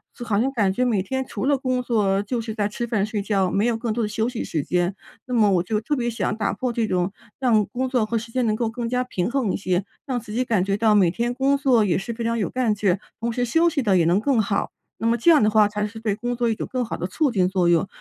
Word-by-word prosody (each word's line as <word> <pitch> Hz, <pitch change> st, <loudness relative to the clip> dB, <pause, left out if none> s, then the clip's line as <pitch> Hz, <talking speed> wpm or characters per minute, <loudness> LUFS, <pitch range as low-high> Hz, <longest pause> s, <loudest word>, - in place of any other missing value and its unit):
就 240 Hz, -, -7 dB
好 205 Hz, -3 st, 0 dB
像 270 Hz, +2 st, 0 dB
感 205 Hz, -7 st, +1 dB
觉 250 Hz, -, 0 dB
每 225 Hz, -6 st, +1 dB
天， 265 Hz, +6 st, -3 dB
除 235 Hz, 0 st, -4 dB
了 280 Hz, -1 st, +3 dB
工 255 Hz, -1 st, -1 dB
作 205 Hz, -5 st, +1 dB
就 230 Hz, +3 st, -3 dB
是 220 Hz, -1 st, -5 dB
在 205 Hz, -2 st, 0 dB
吃 235 Hz, +3 st, -4 dB
饭 215 Hz, -4 st, 0 dB
睡 215 Hz, -2 st, -3 dB
觉， 195 Hz, -2 st, +1 dB
没 200 Hz, +4 st, +1 dB
有 235 Hz, -2 st, +1 dB
更 225 Hz, -2 st, -2 dB
多 235 Hz, 0 st, -1 dB
的 -, -, 0 dB
休 220 Hz, +2 st, -1 dB
息 245 Hz, -2 st, -4 dB
时 155 Hz, -, -2 dB
间， 180 Hz, +1 st, 0 dB, 0.3 s
那 250 Hz, -, -4 dB
么 215 Hz, -4 st, +4 dB
我 180 Hz, -2 st, +2 dB
就 210 Hz, +3 st, -1 dB
特 295 Hz, +7 st, -1 dB
别 240 Hz, -2 st, -1 dB
想 220 Hz, -2 st, -2 dB
打 220 Hz, -, -1 dB
破 250 Hz, -2 st, -3 dB
这 230 Hz, -1 st, 0 dB
种， 180 Hz, +1 st, 0 dB, 0.3 s
让 225 Hz, -6 st, +3 dB
工 255 Hz, +5 st, -2 dB
作 250 Hz, -4 st, +1 dB
和 230 Hz, +1 st, -1 dB
时 230 Hz, +1 st, -6 dB
间 250 Hz, 0 st, 0 dB
能 215 Hz, -, +2 dB
够 225 Hz, +1 st, -1 dB
更 235 Hz, 0 st, -4 dB
加 250 Hz, +1 st, 0 dB
平 210 Hz, -3 st, -2 dB
衡 255 Hz, -8 st, 0 dB
一 -, -, 0 dB
些， 185 Hz, 0 st, -1 dB, 0.2 s
让 255 Hz, -3 st, -2 dB
自 210 Hz, -2 st, -10 dB
己 250 Hz, +3 st, +1 dB
感 210 Hz, -6 st, +1 dB
觉 195 Hz, -, 0 dB
到 215 Hz, 0 st, +3 dB
每 190 Hz, -5 st, +5 dB
天 235 Hz, +7 st, -2 dB
工 270 Hz, +2 st, +2 dB
作 250 Hz, -6 st, +3 dB
也 175 Hz, -, +1 dB
是 195 Hz, +5 st, -4 dB
非 230 Hz, 0 st, -5 dB
常 230 Hz, 0 st, 0 dB
有 210 Hz, -, -1 dB
干 245 Hz, -4 st, 0 dB
劲， 200 Hz, -3 st, +1 dB, 0.2 s
同 235 Hz, 0 st, -1 dB
时 245 Hz, +1 st, -1 dB
休 325 Hz, +8 st, +3 dB
息 300 Hz, -4 st, -1 dB
地 200 Hz, -5 st, +2 dB
也 175 Hz, -, +4 dB
能 175 Hz, +4 st, +3 dB
更 245 Hz, -1 st, +2 dB
好， 200 Hz, -1 st, -1 dB, 0.3 s
那 225 Hz, -, -1 dB
么 230 Hz, -, +3 dB
这 335 Hz, +9 st, +5 dB
样 305 Hz, -, +6 dB
的 210 Hz, -, +4 dB
话， 210 Hz, -1 st, +4 dB
才 210 Hz, 0 st, -2 dB
是 220 Hz, +1 st, -10 dB
对 215 Hz, -3 st, 0 dB
工 245 Hz, +2 st, -3 dB
作 235 Hz, -1 st, 0 dB
一 -, -, +2 dB
种 -, -, -5 dB
更 255 Hz, -1 st, -1 dB
好 230 Hz, -, -4 dB
的 180 Hz, -, -3 dB
促 275 Hz, -, 0 dB
进 185 Hz, -5 st, +2 dB
作 185 Hz, -2 st, +1 dB
用。 170 Hz, +2 st, +3 dB
225 Hz, 325 characters per minute, -23 LUFS, 200-245 Hz, 0.3 s, 样